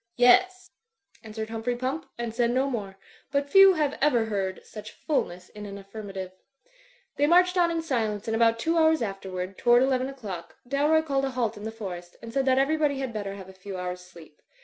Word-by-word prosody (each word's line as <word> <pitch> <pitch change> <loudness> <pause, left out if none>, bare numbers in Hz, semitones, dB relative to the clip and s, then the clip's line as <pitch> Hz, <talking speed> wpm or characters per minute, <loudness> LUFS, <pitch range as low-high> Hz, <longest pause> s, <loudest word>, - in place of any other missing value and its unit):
"Yes," 370 +10 +4 0.5
answered 220 0 -6
Humphrey 225 +2 -2
Pump, 260 +6 -3
and 235 -2 -4
said 235 0 +1
no 260 +3 +1
more; 205 -7 -4 0.3
but 280 0 -1
few 390 0 +8
have 295 -3 -1
ever 250 -6 +3
heard 195 -3 -3
such 210 - -10
fulness 180 - -3
in 210 0 -9
an 200 0 -7
affirmative. 195 -2 -7 0.9
They 290 - +3
marched 360 +2 +5
on 350 -2 +3
in 330 -1 -2
silence 225 -8 -2
and 225 - -1
about 230 0 +3
two 330 +8 +1
hours 315 -4 +4
afterward, 190 -2 -5
toward 240 +1 +5
eleven 260 0 +1
o'clock, 205 -11 -8
Dalroy 295 +4 +2
called 275 -2 0
a - - -1
halt 240 -4 -1
in 205 0 -9
the 220 - -3
forest, 180 -5 -8
and 230 0 -10
said 270 -1 0
that 260 0 +4
everybody 290 +1 +2
had 265 -3 -4
better 200 -2 -4
have 190 -2 -10
a 190 - -12
few 190 0 -8
hours' 180 0 -4
sleep. 170 -4 -16
235 Hz, 200 wpm, -26 LUFS, 200-280 Hz, 0.9 s, few